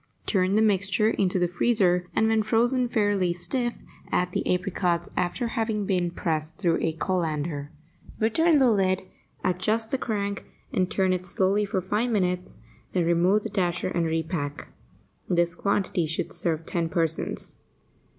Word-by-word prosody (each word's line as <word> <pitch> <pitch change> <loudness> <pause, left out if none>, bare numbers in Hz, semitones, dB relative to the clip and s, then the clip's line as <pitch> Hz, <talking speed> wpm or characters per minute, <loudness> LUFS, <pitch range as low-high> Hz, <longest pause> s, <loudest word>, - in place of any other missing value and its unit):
Turn 190 -1 +2
the 220 - +4
mixture 205 +1 +2
into 190 -3 +1
the 175 -1 +2
freezer, 180 -2 +2
and, 220 - +3
when 220 0 +3
frozen 240 +4 +2
fairly 205 -6 +1
stiff, 235 +8 0 0.4
add 180 0 +1
the - - -1
apricots 180 -2 0
after 230 +7 -1
having 220 -3 -1
been 180 -3 +1
pressed 160 -2 -3
through 170 -5 +1
a 160 - 0
colander. 155 -4 -2 0.5
Return 310 +9 +3
the 260 -4 +5
lid, 190 -3 +1 0.4
adjust 215 +5 0
the 270 - +1
crank, 200 -4 -2 0.3
and 185 -1 +1
turn 190 -1 +2
it 180 0 -3
slowly 195 +3 +1
for 195 -2 -1
five 210 +6 -1
minutes, 180 -5 -1 0.4
then 180 -2 +1
remove 175 +5 +3
the 220 - -3
dasher 185 -3 -1
and 170 -2 0
repack. 160 -3 -3 0.6
This 175 -1 +2
quantity 185 -3 0
should 160 - -3
serve 165 -2 -2
ten 165 -1 -1
persons. 165 -1 -1
185 Hz, 150 wpm, -26 LUFS, 175-215 Hz, 0.6 s, the